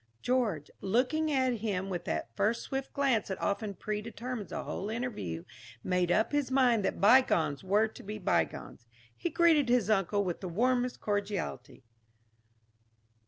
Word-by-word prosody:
George, 225 - 0
looking 260 +10 +1
at 260 -3 +2
him 195 -3 -2
with 175 -3 -4
that 95 +10 -3
first 220 +3 +1
swift 270 -1 -4
glance 270 -6 +1
that 190 - -4
often 200 0 -2
predetermines 220 +3 -5
a - - -3
whole 200 - -4
interview, 215 - -4 0.4
made 180 -1 +1
up 220 +4 +2
his 290 -3 0
mind 250 -5 +3
that - - -1
bygones 195 - +4
were 205 +4 +3
to 220 - -12
be 210 +2 -6
bygones. 180 - -2 0.3
He 345 - -3
greeted 325 -7 +4
his 240 -4 +3
uncle 200 0 +2
with 180 -3 -3
the 185 - -4
warmest 245 +6 0
cordiality. 200 -11 -3
215 Hz, 150 wpm, -31 LUFS, 190-250 Hz, 0.4 s, bygones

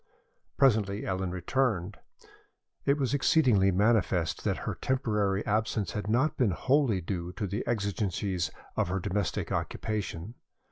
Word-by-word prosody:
Presently 110 -7 +3
Ellen 95 -1 -1
returned. 95 +1 -1 0.9
It 140 +1 +3
was 135 -2 0
exceedingly 130 -9 +4
manifest 95 -4 +2
that - - +1
her - - -1
temporary 105 -6 0
absence 105 -1 0
had 105 0 -4
not 130 +7 +2
been 125 -5 +3
wholly 125 - +2
due 90 0 -4
to 105 - -3
the 100 +2 -3
exigencies 100 -4 -1 0.3
of 110 - +1
her 95 +2 -1
domestic 95 +2 -2
occupation. 105 -2 -3
105 Hz, 130 wpm, -29 LUFS, 95-120 Hz, 0.9 s, exceedingly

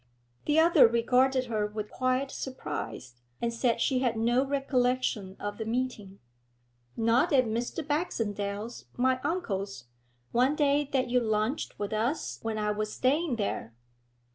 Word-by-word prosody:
The 300 +1 +2
other 335 -6 +7
regarded 255 +3 +2
her 215 -3 -1
with 210 0 -6
quiet 255 +1 0
surprise, 150 - -5 0.3
and 235 0 -1
said 235 0 +1
she 260 -2 +2
had 245 -3 0
no 240 +3 +3
recollection 255 -7 0
of 205 +1 -5
the 220 - -3
meeting. 225 -5 -3 0.8
'Not 230 +8 +3
at 260 -3 +5
Mr. 240 +7 -3
Baxendale's, 220 - -2
my 255 +1 +2
uncle's, 200 - -2 0.5
one 255 +5 +3
day 290 -1 +2
that 255 -2 0
you 250 - +4
lunched 220 +4 -1
with 205 +1 -3
us 235 +9 -1
when 225 -1 -3
I 210 0 0
was 210 0 -2
staying 285 +4 +1
there?' 160 - -3
240 Hz, 140 wpm, -29 LUFS, 215-265 Hz, 0.8 s, other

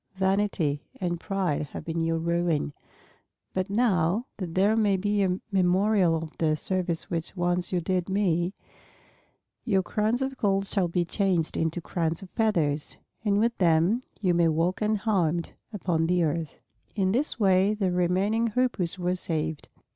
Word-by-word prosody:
Vanity 190 -6 0 0.2
and 175 -2 -2
pride 190 -5 -1
have - - -6
been 165 0 -2
your 165 0 +1
ruin. 170 -3 0 0.8
But 185 +1 -1
now, 200 -1 +2
that 175 -5 -5
there 200 +4 +3
may 205 -3 +3
be 205 +2 0
a 185 -1 +1
memorial 190 -1 +3
of 160 -1 -5
the 155 -2 +2
service 175 0 -1
which 170 +2 -3
once 175 0 0
you 180 -2 0
did 180 +2 -1
me, 185 -2 +1 1.1
your 195 -5 +2
crowns 220 +7 0
of 265 0 -4
gold 195 -4 +1
shall 195 -2 0
be 175 +1 0
changed 180 -3 0
into 165 +2 -1
crowns 165 0 -2
of 185 - -12
feathers, 160 -10 +1 0.3
and 205 -2 +2
with 230 +2 +2
them 175 +6 +3 0.2
you 185 -4 +2
may 170 -1 +3
walk 165 +5 0
unharmed 195 -6 0 0.2
upon 170 -6 0
the 175 0 +2
earth." 160 -1 -2 0.4
In 190 -3 +1
this 255 +4 -1
way 195 0 +3
the 195 -4 0
remaining 190 +6 +1
Hoopoes 215 -7 0
were 180 0 0
saved. 160 -3 -2
185 Hz, 155 wpm, -27 LUFS, 165-200 Hz, 1.1 s, there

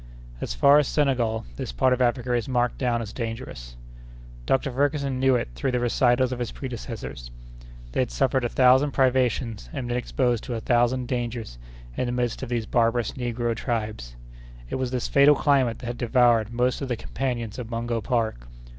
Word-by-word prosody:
As - - -3
far 140 - +6
as 145 - +1
Senegal, 120 -6 0
this - - -4
part 125 - +2
of 125 - -1
Africa 125 0 +1
is 120 +1 -1
marked 120 -1 0
down 120 -3 0
as 110 - -8
dangerous. 115 - -6 0.7
Dr. 135 +1 +1
Ferguson 140 0 0
knew 130 -1 +4
it 120 - -1
through - - -2
the 125 - 0
recitals 120 +1 +2
of 125 - -4
his 120 -2 -3
predecessors. 115 - -7 0.6
They - - -2
had - - +1
suffered 90 - +1
a 120 - 0
thousand 130 +3 +4
privations 125 - +1
and 125 - -4
been 120 0 -1
exposed 125 -2 0
to 125 - -3
a - - -2
thousand 120 +2 +1
dangers 120 - -4 0.4
in 125 - -1
the - - -1
midst 120 -2 -1
of 130 - -5
these 120 -2 -1
barbarous 115 0 +1
negro 120 -2 -2
tribes. 105 - -4 0.6
It - - -1
was 130 -1 -1
this 125 -1 -2
fatal 140 +1 +6
climate 135 -6 +2
that - - -10
had 120 0 -4
devoured 120 -3 +3
most 125 +2 0
of 135 - -3
the 125 - -1
companions 120 -3 -4
of 120 -2 -6
Mungo 115 0 -2
Park. 110 - -1
120 Hz, 190 wpm, -25 LUFS, 115-130 Hz, 0.7 s, far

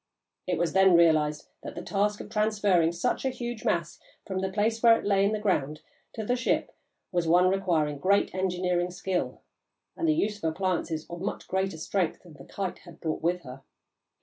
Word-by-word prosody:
It 180 -2 0
was 170 0 0
then 190 -2 +6
realised 155 -3 +3
that - - -8
the - - -6
task 205 +1 0
of - - -10
transferring 205 -6 +2
such 170 +9 -1
a 265 - +1
huge 240 -3 -5
mass 170 -2 -1 0.3
from 190 -1 -3
the 190 0 -2
place 220 +3 0
where 230 -1 +7
it - - -8
lay 200 -1 +3
in 200 - +2
the 215 - 0
ground 155 -8 -1 0.3
to 220 - -5
the 245 - +1
ship 250 -1 -1 0.4
was 175 -2 0
one 180 +2 +5
requiring 165 -7 0
great 200 +5 +2
engineering 180 -1 0
skill 180 0 -3 0.5
and 335 - -1
the 310 - +3
use 210 -9 -1
of - - -26
appliances 165 -2 -2
of 170 0 -8
much 200 - -4
greater 190 -2 -1
strength 175 +2 -2
than 175 -3 -14
the 135 -2 -13
Kite 195 -2 -4
had 170 -2 -15
brought 160 -1 -3
with 175 +2 0
her. 130 -3 -10
185 Hz, 200 wpm, -28 LUFS, 170-205 Hz, 0.5 s, where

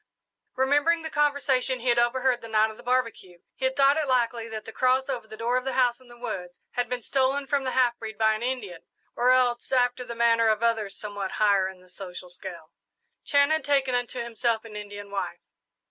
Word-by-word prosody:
Remembering 290 +5 +2
the 320 - -5
conversation 280 -4 +1
he 245 +1 -1
had 240 0 +4
overheard 250 +1 +2
the 230 - -8
night 220 0 +2
of 220 - -14
the - - -12
barbecue, 230 -8 -1 0.2
he 260 - -3
had 260 0 +1
thought 280 +1 +4
it 310 -2 0
likely 235 -3 0
that 220 -1 -6
the 225 - -7
cross 255 +2 +2
over 245 -4 -3
the 220 - -10
door 235 +2 0
of 255 - -1
the 265 0 -3
house 245 -1 +2
in 255 - -20
the 240 0 -14
woods 190 -7 -6
had 245 - -2
been 250 -2 -3
stolen 270 +2 +1
from 275 -1 0
the - - 0
half 245 -2 +2
breed 220 -2 -7
by 220 0 +3
an 215 - -4
Indian, 235 -9 -3 0.3
or 245 +1 +2
else, 250 -1 +2
after 250 -1 +2
the 235 -1 -7
manner 230 -1 +3
of 220 +1 +1
others 225 -4 0
somewhat 205 -2 -5
higher 200 -3 +3
in 190 -1 -13
the 185 - -20
social 180 -1 -9
scale, 175 -3 -9 0.5
Chan 285 +1 +3
had 315 0 +2
taken 275 -3 +1
unto 245 0 -1
himself 235 -1 -1
an 215 -2 -10
Indian 205 -1 -8
wife. 200 - -4
240 Hz, 225 wpm, -26 LUFS, 215-260 Hz, 0.5 s, had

